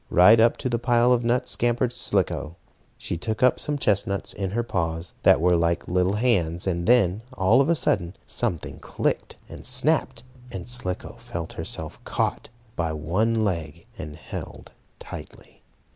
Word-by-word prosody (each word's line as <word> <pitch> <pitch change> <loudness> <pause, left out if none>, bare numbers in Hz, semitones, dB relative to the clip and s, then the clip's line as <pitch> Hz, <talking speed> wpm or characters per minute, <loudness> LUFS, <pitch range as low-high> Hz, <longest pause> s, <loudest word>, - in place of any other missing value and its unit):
Right 105 +6 +7
up 115 +1 +4
to 130 - -3
the 120 -2 0
pile 120 0 +4
of 120 -1 +1
nuts 120 +2 0
scampered 120 +1 +1
Slicko. 80 -7 0 0.4
She 85 - -4
took 110 +7 -3
up 125 - +4
some 145 -1 -1
chestnuts 100 -5 0
in 95 -2 -3
her 120 +5 -1
paws, 80 -5 -3
that - - +6
were 90 +2 +4
like 85 0 0
little 90 +2 +1
hands, 90 -8 +1
and 85 -1 -1
then, 110 -5 +4 0.2
all 95 +8 +5
of 140 - +1
a 170 - +4
sudden, 90 - 0
something 100 -10 -3
clicked, - - -2
and - - -10
snapped, 130 +1 0 0.3
and 95 -5 -6
Slicko 115 -2 -4
felt 100 -9 -6
herself 80 -1 -6
caught - - -2 0.3
by 80 -2 -1
one 105 +9 0
leg, 85 -7 -3
and 75 -1 -7
held 80 - -8 0.3
tightly. - - -11
100 Hz, 160 wpm, -25 LUFS, 85-120 Hz, 0.4 s, Right